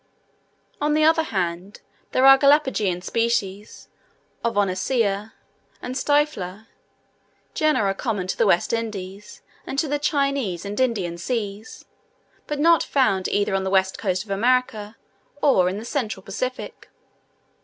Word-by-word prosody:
On 295 Hz, +1 st, +1 dB
the 310 Hz, -, +3 dB
other 320 Hz, +1 st, +5 dB
hand, 185 Hz, -, -3 dB, 0.3 s
there 260 Hz, -, +3 dB
are 270 Hz, 0 st, +10 dB
Galapageian 265 Hz, -10 st, +2 dB
species 210 Hz, -3 st, -2 dB, 0.6 s
of 230 Hz, -3 st, -1 dB
Oniscia 205 Hz, +2 st, 0 dB, 0.5 s
and 250 Hz, -, -6 dB
Stylifer, 260 Hz, -9 st, 0 dB, 0.9 s
genera 300 Hz, -11 st, +2 dB
common 205 Hz, -2 st, -3 dB
to 185 Hz, -, -3 dB
the -, -, +2 dB
West 175 Hz, -, +2 dB
Indies 205 Hz, -3 st, -5 dB, 0.2 s
and 270 Hz, -, -5 dB
to 310 Hz, -, +1 dB
the 290 Hz, +1 st, -1 dB
Chinese 275 Hz, -, -1 dB
and 205 Hz, +3 st, -5 dB
Indian 195 Hz, -10 st, -1 dB
seas, 210 Hz, 0 st, -5 dB, 0.6 s
but 295 Hz, -, -3 dB
not 330 Hz, +2 st, +4 dB
found 195 Hz, -9 st, +1 dB
either 205 Hz, 0 st, 0 dB
on 195 Hz, 0 st, 0 dB
the 190 Hz, -, -2 dB
west 190 Hz, 0 st, +1 dB
coast 185 Hz, -2 st, -1 dB
of 210 Hz, -, -11 dB
America 220 Hz, -1 st, 0 dB, 0.4 s
or 190 Hz, -12 st, +3 dB
in 190 Hz, -, -4 dB
the 220 Hz, -, -7 dB
central 225 Hz, -8 st, -3 dB
Pacific. 255 Hz, +7 st, -5 dB
215 Hz, 135 wpm, -23 LUFS, 195-270 Hz, 0.9 s, are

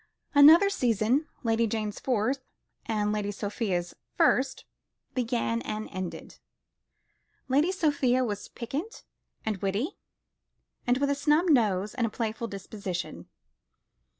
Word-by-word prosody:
Another 310 Hz, +7 st, +8 dB
season, 245 Hz, -, +1 dB, 0.2 s
Lady 230 Hz, 0 st, +2 dB
Jane's 215 Hz, -1 st, -3 dB
fourth, 255 Hz, +2 st, 0 dB, 0.5 s
and 210 Hz, -2 st, 0 dB
Lady 210 Hz, -1 st, -1 dB
Sophia's 200 Hz, -4 st, -2 dB, 0.2 s
first, 260 Hz, +1 st, +2 dB, 0.5 s
began 235 Hz, -2 st, 0 dB
and 215 Hz, -1 st, -4 dB
ended. 185 Hz, -2 st, -6 dB, 1.1 s
Lady 290 Hz, +7 st, +3 dB
Sophia 285 Hz, -8 st, +2 dB
was 205 Hz, -3 st, -4 dB
piquant 290 Hz, -, -6 dB, 0.4 s
and 215 Hz, -2 st, -1 dB
witty, 200 Hz, -, -2 dB, 0.9 s
with 270 Hz, +3 st, +2 dB
a -, -, +4 dB
snub 300 Hz, +5 st, +2 dB
nose 210 Hz, -, +2 dB
and 235 Hz, -2 st, 0 dB
a -, -, -4 dB
playful 225 Hz, +1 st, -3 dB
disposition. 195 Hz, -3 st, -6 dB
230 Hz, 110 wpm, -28 LUFS, 210-275 Hz, 1.1 s, Another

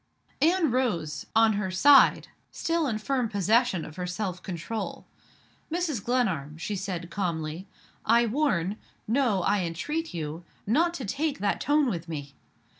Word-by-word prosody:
Anne 330 Hz, -1 st, +3 dB
rose 210 Hz, -12 st, -1 dB
on 225 Hz, -1 st, +5 dB
her 200 Hz, -2 st, -1 dB
side, 270 Hz, +10 st, +6 dB, 0.2 s
still 330 Hz, -2 st, -1 dB
in 225 Hz, -4 st, -1 dB
firm 250 Hz, +1 st, -1 dB
possession 210 Hz, -2 st, +2 dB
of 155 Hz, -, -11 dB
her 180 Hz, -1 st, -3 dB
self 180 Hz, 0 st, -3 dB
control. 185 Hz, +5 st, -5 dB, 0.7 s
"Mrs. 320 Hz, -, -1 dB
Glenarm," 185 Hz, -, 0 dB
she 205 Hz, +5 st, -3 dB
said, 180 Hz, -3 st, -4 dB
calmly, 170 Hz, -1 st, -3 dB, 0.4 s
"I 235 Hz, +2 st, +4 dB
warn 215 Hz, -, 0 dB, 0.3 s
no, 225 Hz, -5 st, +2 dB
I 205 Hz, +2 st, +2 dB
entreat 295 Hz, -, -3 dB
you 160 Hz, 0 st, -5 dB, 0.2 s
not 335 Hz, -, +2 dB
to 265 Hz, -, -5 dB
take 285 Hz, +7 st, -1 dB
that 205 Hz, -4 st, -1 dB
tone 295 Hz, -1 st, +3 dB
with 170 Hz, -7 st, -3 dB
me. 145 Hz, -3 st, -6 dB
210 Hz, 145 wpm, -27 LUFS, 175-265 Hz, 0.7 s, side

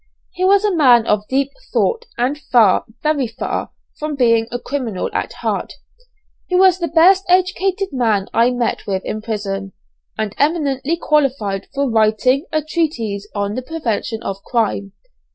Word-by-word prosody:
He 365 Hz, -, -4 dB
was 400 Hz, +2 st, +4 dB
a 405 Hz, -3 st, +1 dB
man 245 Hz, -7 st, +5 dB
of 210 Hz, -1 st, 0 dB
deep 275 Hz, +1 st, 0 dB, 0.2 s
thought, 475 Hz, 0 st, 0 dB
and 250 Hz, +4 st, 0 dB
far, 240 Hz, -9 st, +3 dB, 0.2 s
very 300 Hz, -4 st, +1 dB
far, 225 Hz, -, -4 dB, 0.3 s
from 300 Hz, -1 st, -3 dB
being 230 Hz, -3 st, +3 dB
a 245 Hz, -, -2 dB
criminal 245 Hz, -6 st, -3 dB
at -, -, -2 dB
heart. -, -, -3 dB, 0.7 s
He 365 Hz, -, -1 dB
was 370 Hz, -1 st, +5 dB
the 340 Hz, -, -1 dB
best 355 Hz, +5 st, +5 dB
educated 375 Hz, +1 st, +1 dB
man 225 Hz, -7 st, +1 dB
I 235 Hz, +2 st, +4 dB
met 245 Hz, -2 st, -2 dB
with 190 Hz, -1 st, -2 dB
in 215 Hz, -, -4 dB
prison, 195 Hz, -3 st, -4 dB, 0.4 s
and 215 Hz, -2 st, -2 dB
eminently 290 Hz, 0 st, 0 dB
qualified 260 Hz, -, 0 dB
for 280 Hz, 0 st, +1 dB
writing 230 Hz, -, +2 dB
a 310 Hz, -1 st, 0 dB
treatise 235 Hz, -, -2 dB
on 200 Hz, 0 st, -1 dB
the 255 Hz, -, -3 dB
prevention 240 Hz, -6 st, -3 dB
of 195 Hz, 0 st, -4 dB
crime. 205 Hz, -4 st, -1 dB
255 Hz, 155 wpm, -18 LUFS, 215-315 Hz, 0.7 s, man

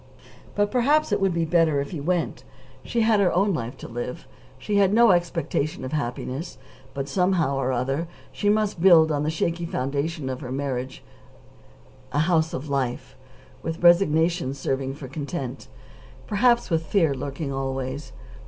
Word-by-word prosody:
But 205 Hz, 0 st, +1 dB
perhaps 285 Hz, +3 st, +2 dB
it 205 Hz, -1 st, +1 dB
would 195 Hz, -1 st, +3 dB
be 170 Hz, -1 st, 0 dB
better 160 Hz, -3 st, +3 dB
if 140 Hz, 0 st, -4 dB
he 160 Hz, -, -5 dB
went. 170 Hz, +1 st, -1 dB, 0.4 s
She 235 Hz, -, -1 dB
had 220 Hz, -1 st, +4 dB
her 195 Hz, -3 st, +3 dB
own 195 Hz, +3 st, +2 dB
life 125 Hz, -3 st, -4 dB
to -, -, -9 dB
live. 120 Hz, +6 st, -6 dB, 0.3 s
She 205 Hz, -1 st, -1 dB
had 195 Hz, -1 st, +4 dB
no 235 Hz, -2 st, +6 dB
expectation 170 Hz, -5 st, -1 dB
of 130 Hz, -, -5 dB
happiness, 140 Hz, +2 st, -4 dB, 0.4 s
but, 135 Hz, 0 st, -3 dB
somehow 175 Hz, -3 st, +1 dB
or 130 Hz, -1 st, 0 dB
other, 135 Hz, +6 st, -1 dB, 0.2 s
she 205 Hz, -, -1 dB
must 210 Hz, -4 st, +1 dB
build 165 Hz, -4 st, +7 dB
on 145 Hz, -1 st, 0 dB
the 150 Hz, -, 0 dB
shaky 170 Hz, +2 st, -1 dB
foundation 140 Hz, +2 st, -2 dB
of 130 Hz, +1 st, -4 dB
her 125 Hz, -3 st, -6 dB
marriage 130 Hz, -1 st, -4 dB, 1.1 s
a 145 Hz, -, -2 dB
house 165 Hz, -2 st, +2 dB
of 150 Hz, -3 st, -5 dB
life, 135 Hz, -3 st, -2 dB, 0.5 s
with 165 Hz, +3 st, -5 dB
resignation 165 Hz, -5 st, +4 dB
serving 135 Hz, 0 st, -2 dB
for 140 Hz, -2 st, -8 dB
content, 140 Hz, -1 st, -5 dB, 0.6 s
perhaps 235 Hz, 0 st, +2 dB
with 165 Hz, -1 st, +1 dB
fear 165 Hz, -7 st, +2 dB
lurking 140 Hz, +2 st, -4 dB
always. 135 Hz, +1 st, -4 dB
160 Hz, 160 wpm, -24 LUFS, 135-180 Hz, 1.1 s, build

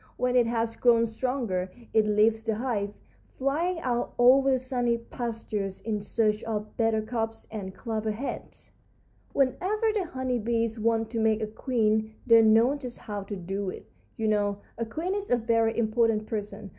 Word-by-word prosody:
When 250 Hz, 0 st, +1 dB
it 245 Hz, -2 st, +5 dB
has 230 Hz, -1 st, -1 dB
grown 230 Hz, -1 st, +4 dB
stronger 225 Hz, -5 st, -2 dB, 0.2 s
it 220 Hz, -1 st, +4 dB
leaves 215 Hz, +1 st, +3 dB
the 220 Hz, -1 st, 0 dB
hive, 215 Hz, -4 st, -1 dB, 0.5 s
flying 325 Hz, +7 st, 0 dB
out 245 Hz, -3 st, -1 dB
over 265 Hz, +3 st, +6 dB
the 260 Hz, -, +4 dB
sunny 245 Hz, -2 st, 0 dB
pastures 225 Hz, -5 st, -4 dB
in 215 Hz, -2 st, -3 dB
search 215 Hz, 0 st, 0 dB
of 215 Hz, -1 st, -4 dB
buttercups 225 Hz, 0 st, -1 dB
and 195 Hz, -3 st, -6 dB
clover 220 Hz, -1 st, -3 dB
heads. 225 Hz, +6 st, -6 dB, 0.6 s
"Whenever 380 Hz, -, +1 dB
the 410 Hz, -4 st, 0 dB
honey 260 Hz, -5 st, -2 dB
bees 230 Hz, 0 st, -1 dB
want 225 Hz, 0 st, +1 dB
to 230 Hz, -, -2 dB
make 220 Hz, 0 st, +2 dB
a -, -, +1 dB
queen 220 Hz, -1 st, 0 dB
they 230 Hz, -2 st, +7 dB
know 225 Hz, +4 st, +5 dB
just 255 Hz, -4 st, -7 dB
how 205 Hz, -2 st, -5 dB
to 200 Hz, +1 st, -6 dB
do 195 Hz, +2 st, -3 dB
it. -, -, -8 dB, 0.3 s
You 220 Hz, -, -1 dB
know, 205 Hz, -1 st, +1 dB
a 230 Hz, -, -3 dB
queen 335 Hz, +10 st, -2 dB
is 405 Hz, 0 st, -3 dB
a 245 Hz, -, +4 dB
very 230 Hz, -1 st, +1 dB
important 225 Hz, -1 st, +2 dB
person. 210 Hz, -2 st, -5 dB
225 Hz, 170 wpm, -27 LUFS, 215-245 Hz, 0.6 s, they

